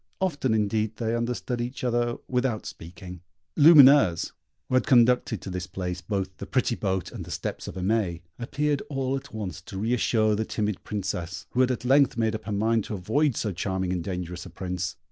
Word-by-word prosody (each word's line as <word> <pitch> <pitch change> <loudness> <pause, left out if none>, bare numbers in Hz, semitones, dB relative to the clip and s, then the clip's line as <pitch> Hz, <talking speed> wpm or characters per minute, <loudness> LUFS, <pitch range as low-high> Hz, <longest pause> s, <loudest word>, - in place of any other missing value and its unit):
Often, 145 - 0
indeed, 110 0 0
they 115 0 -1
understood 120 +1 -2
each 125 +2 -5
other 120 -1 0
without 125 -3 -1
speaking. 90 +1 -9 0.3
Lumineuse, 140 - +7 0.4
who - - -6
had 130 - +3
conducted 120 -4 +4
to 95 - -6
this 90 0 -4
place 90 -1 -4
both 95 +1 -3
the 100 - -7
pretty 130 -2 +1
boat 95 -5 -2
and - - -7
the - - -11
steps - - -4
of - - -7
Aimée, 95 -2 0 0.2
appeared 145 +4 -1
all 135 -2 -1
at 135 0 -7
once 105 -6 -5
to 95 - -9
re 110 +5 0
assure 110 -3 +2
the 110 - 0
timid 105 -2 -2
Princess, 90 -3 -4
who 125 - +2
had 130 - +3
at 125 0 -2
length 135 -1 +4
made 110 -1 +1
up 110 0 -5
her 105 - -4
mind 110 +2 +1
to 105 - -4
avoid 125 +9 +1
so 105 - -1
charming 95 0 -2
and 90 -2 -2
dangerous 90 -1 -5
a - - -10
Prince. 90 -1 -4
110 Hz, 200 wpm, -26 LUFS, 95-125 Hz, 0.4 s, Lumineuse